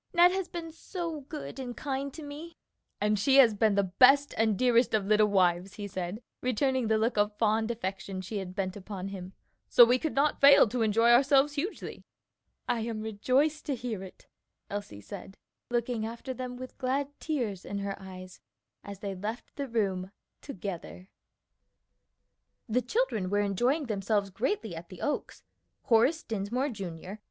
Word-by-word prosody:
Ned 350 +1 +7
has 380 -1 -2
been 335 -2 -6
so 330 -2 -5
good 300 -3 -7
and 245 -2 -6
kind 275 -1 -3
to 315 - -8
me!" 300 +4 -9 0.4
"And 210 0 +1
she 265 +6 +3
has 245 -5 +7
been 210 0 +2
the 200 - +3
best 265 +9 +5
and 220 -2 +2
dearest 245 -2 +3
of 205 -2 0
little 215 +1 +4
wives," 185 -1 +2
he 205 -1 -5
said, 185 +4 -5 0.2
returning 255 0 +1
the 220 0 +3
look 225 +1 0
of 210 0 +1
fond 220 0 +2
affection 195 -4 -4
she 200 +3 -4
had 185 -1 -7
bent 185 -2 -2
upon 195 -1 -6
him, 190 -1 -8 0.4
"so 240 - +9
we 250 +2 +3
could 315 - -3
not 285 +2 +2
fail 280 -3 +8
to 245 +2 -2
enjoy 225 +2 +4
ourselves 275 +3 +5
hugely." 325 +9 -4 0.6
"I 245 -2 +1
am 225 -1 -3
rejoiced 255 +9 0
to 280 - 0
hear 235 -5 -4
it," 190 -1 -11 0.5
Elsie 200 - -5
said, 190 - -9 0.3
looking 240 -1 -1
after 235 +4 -5
them 250 0 -6
with 255 0 -9
glad 275 +2 0
tears 235 - -2
in 200 - -5
her 200 0 -3
eyes 185 -1 -10 0.4
as 200 -1 -9
they 200 -1 -3
left 210 +5 -6
the 280 -1 -3
room 195 -6 -1 0.3
together. 190 - -7 1.6
The 245 +2 +1
children 250 - 0
were 205 +1 +2
enjoying 240 - +1
themselves 205 -2 -1
greatly 225 - -2
at 170 +1 -9
the 185 - -11
Oaks. 295 - -3 0.4
Horace 250 +7 +3
Dinsmore, 225 +6 -2
Jr. 190 - -7
225 Hz, 170 wpm, -29 LUFS, 200-265 Hz, 1.6 s, so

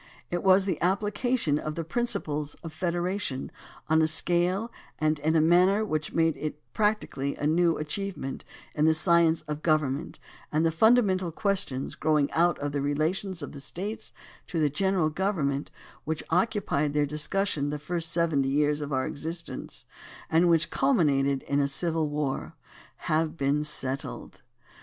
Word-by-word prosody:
It 175 0 -1
was 190 0 +5
the 185 -5 -2
application 205 - +1
of 155 0 -4
the 165 - -3
principles 160 -7 -2
of 165 -2 -7
federation 175 -3 -2 0.4
on 160 +1 +4
a 160 - +4
scale 175 +7 0 0.3
and 155 -1 +1
in 155 +2 +1
a 160 - +5
manner 180 +6 +4
which 155 -6 -2
made 165 -1 +2
it 150 -1 -4
practically 210 -10 0
a - - -4
new 165 +2 +3
achievement 155 -2 -4 0.3
in 150 - +1
the 160 0 +4
science 165 0 +3
of 150 0 -5
government 155 -2 0 0.3
and 155 +2 +2
the 165 - +3
fundamental 190 -2 +3
questions 185 -8 0
growing 150 -2 +1
out 175 +1 +2
of 145 0 -3
the 140 0 -1
relations 160 +5 -1
of - - -6
the 140 - -9
States 200 +9 -5 0.4
to 170 - -2
the 150 -2 +2
general 185 0 +1
government, 150 -6 -1 0.3
which 160 0 -3
occupied 185 -5 +1
in 145 - -1
their 150 0 +2
discussion 150 +1 -1
the 150 - -2
first 165 +2 -2
seventy 160 -6 +1
years 150 +1 +1
of 145 0 -5
our 130 -1 0
existence, 165 +3 -5 0.5
and 165 +2 +4
which 165 +1 +2
culmi 170 - +3
nated 135 -1 0
in 140 - 0
a 140 - +2
civil 160 +2 0
war, 145 -2 -3 0.5
have 155 +1 0
been 140 +1 +1
settled. 140 -1 -4
160 Hz, 160 wpm, -27 LUFS, 150-180 Hz, 0.5 s, was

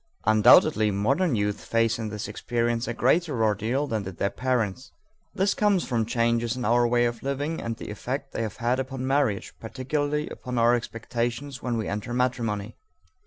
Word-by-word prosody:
Undoubtedly 110 0 +6
modern 130 - +1
youth 105 -1 -1
face 115 0 +1
in 110 -1 -3
this 105 +3 -5
experience 120 0 -1
a 120 - -2
greater 135 -2 +2
ordeal 110 +6 +1
than 110 -6 -2
did 95 -3 -8
their 100 - 0
parents. 120 +1 -1 0.4
This 195 +1 +2
comes 205 -4 +2
about - - -9
from 115 -3 +1
changes 115 0 +1
in 125 - -3
our 120 +2 +3
way 120 0 +3
of 120 -1 -2
living 145 +4 -2
and 115 0 -3
the - - -7
effect 135 +6 -4
they - - -2
have 110 -3 -4
had 125 +2 0
upon 130 0 -4
marriage, 135 -7 0
particularly 145 +5 -2
upon 125 -1 -5
our 120 +1 +5
expectations 120 +3 -3
when 120 -2 -1
we 110 - -2
enter 105 +4 -3
matrimony. 120 -5 -1
120 Hz, 180 wpm, -26 LUFS, 110-130 Hz, 0.4 s, Undoubtedly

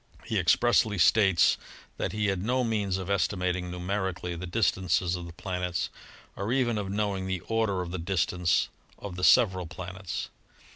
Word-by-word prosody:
He 110 - 0
expressly 105 +4 +3
states 95 +1 +4 0.4
that - - -2
he 105 0 -1
had 95 -3 0
no 125 +5 +1
means 105 -5 0
of 95 - -5
estimating 90 -2 0
numerically 90 -1 -3
the 90 +2 -6
dis 100 +1 +2
tances 90 -1 0
of 85 -1 -6
the 85 - -10
planets 90 0 -3 0.4
or 100 +4 -3
even 120 -4 +1
of 100 -2 -4
knowing 100 -2 -1
the 95 -2 -2
order 110 -4 0
of 85 - -7
the 95 - -3
distance 90 -2 +1 0.3
of 100 -3 -7
the 90 - -6
several 95 -4 +5
planets. 90 +1 -6
95 Hz, 165 wpm, -28 LUFS, 90-105 Hz, 0.4 s, several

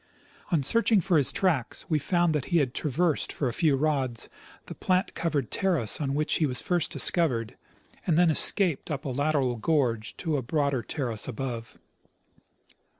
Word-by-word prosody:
On 160 -5 +2
searching 230 - +3
for 185 -1 0
his 140 - +1
tracks, 160 -11 -1
we 155 -2 +1
found 175 +2 +1
that 150 -4 -2
he 170 - +1
had 135 -6 +1
traversed 155 +2 -1
for 140 - -2
a 120 - -2
few 155 0 +2
rods 135 -5 -1 0.4
the - - -8
plant 185 0 0
covered 155 -8 -2
terrace 170 - +3
on 140 -1 -1
Avhich 150 +1 0
he 155 - +2
was 125 -2 -1
first 175 -3 -1
discovered, 125 -11 0 0.5
and 165 -3 +2
then 175 -2 +4
escaped 175 0 +3
up 140 -3 -4
a - - -2
lateral 135 -2 0
gorge 120 -5 -1
to 160 -4 -2
a - - -2
broader 140 0 -1
terrace 120 -4 -3
above. 120 -2 -6
145 Hz, 170 wpm, -27 LUFS, 130-165 Hz, 0.5 s, then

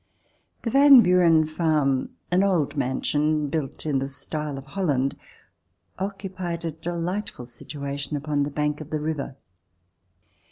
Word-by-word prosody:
The 230 - -1
Van 275 -1 +9
Buren 175 -4 +5
farm, 155 -4 +1 0.2
an 180 +1 +4
old 165 -7 +1
mansion 145 +3 0
built 150 -2 -3
in 145 -3 +1
the 135 - -2
style 150 +1 -5
of 135 - -7
Holland, 140 -4 -1 0.8
occupied 185 -3 -4
a 165 - -1
delightful 170 -1 -4
situation 140 +4 -5
upon 145 0 -1
the 140 - 0
bank 150 +1 -1
of 155 - -9
the 155 - -2
river. 150 -3 -3
155 Hz, 130 wpm, -25 LUFS, 140-175 Hz, 0.8 s, Van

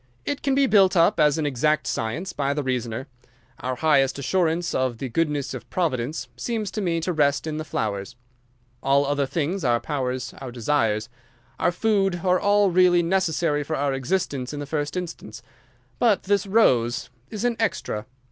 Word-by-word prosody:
"It 285 - -2
can 275 -1 +1
be 275 0 +4
built 195 -7 +4
up 170 - +4
as 150 -1 +4
an 155 - -1
exact 150 +3 +1
science 150 +12 -3
by 140 0 -1
the 150 - -1
reasoner. 125 -1 -2 0.5
Our 130 0 -3
highest 135 -1 +2
assurance 170 +4 0
of 130 -3 0
the 130 +2 -4
goodness 150 0 -1
of 120 -2 -8
Providence 150 -4 -2
seems 220 -4 -3
to 215 - -3
me 170 -3 0
to 180 +2 -1
rest 145 -2 +2
in 155 -1 -3
the 155 - -3
flowers. 105 -4 -3 0.7
All 140 +1 +3
other 140 -1 0
things, 165 +6 -2
our 120 -2 +2
powers 130 -3 -3
our 130 -2 -6
desires, 115 -3 0 0.5
our - - +2
food, 195 -2 +1
are 180 -1 +3
all 205 -1 +3
really 175 -1 +4
necessary 165 -4 +1
for 155 +2 -3
our 140 -1 0
existence 135 -2 -2
in 145 - -5
the 145 - -4
first 145 +3 -3
instance. 160 -9 -7 0.6
But 225 -5 +3
this 200 0 +1
rose 125 - +2 0.2
is 215 +2 -4
an 240 -1 +1
extra. 115 - -2
150 Hz, 175 wpm, -24 LUFS, 130-180 Hz, 0.7 s, be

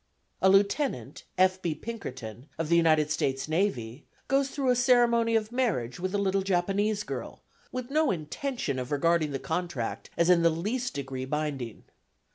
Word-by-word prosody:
A 190 - +5
lieutenant, 195 - +1
F. 185 0 +3
B. 165 -4 -1
Pinkerton, 130 - -7
of 165 -1 -2
the 170 - +4
United 155 -3 +4
States 135 -2 -1
Navy, 150 - -1 0.2
goes 275 0 +2
through 270 -3 0
a - - +3
ceremony 235 -2 +4
of 220 0 0
marriage 195 - -1
with 185 +2 -2
a - - +3
little 195 -1 +1
Japanese 195 +3 0
girl, - - -6 0.3
with 255 +1 -5
no 310 0 +3
intention 165 - -3
of 125 +1 -5
regarding 160 +2 +2
the 140 - -2
contract 160 -6 -3
as 170 - +3
in 180 -1 +5
the 170 - +5
least 215 +10 -2
degree 135 -2 -4
binding. 140 -5 -3
175 Hz, 165 wpm, -28 LUFS, 145-225 Hz, 0.3 s, A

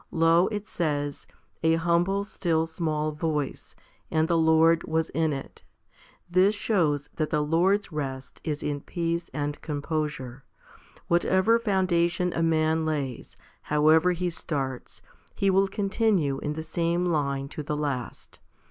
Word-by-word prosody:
Lo, 165 +2 +4
it 210 -1 -4
says, 145 -4 -2 0.3
a 160 0 +3
humble 175 +4 +1
still 165 -5 0
small 155 -2 -2
voice, 150 -2 -3 0.3
and 160 0 +1
the 170 - +1
Lord 160 0 +4
was 160 0 0
in 160 -1 +1
it. 135 -2 -6 0.7
2 185 - +5
This 200 +3 +4
shows 155 -9 0
that 155 -2 0
the 150 - +1
Lord's 180 +6 +2
rest 135 -4 -5
is 150 -2 -3
in 145 -1 -2
peace 170 0 -3
and 145 0 -3
composure. 145 -4 -3 0.6
Whatever 190 +6 +3
founda 185 -6 +2
tion 180 +1 -2
a - - -1
man 160 0 +2
lays, 145 -6 -3 0.2
however 155 +4 +4
he 175 0 -2
starts, 135 -6 -5 0.3
he 195 -1 +2
will 195 +1 +3
continue 195 -8 0
in 150 - -3
the 160 +1 -5
same 170 +1 0
line 140 -5 0
to 155 - -6
the 150 0 -3
last. 140 -5 -4
160 Hz, 145 wpm, -26 LUFS, 150-175 Hz, 0.7 s, 2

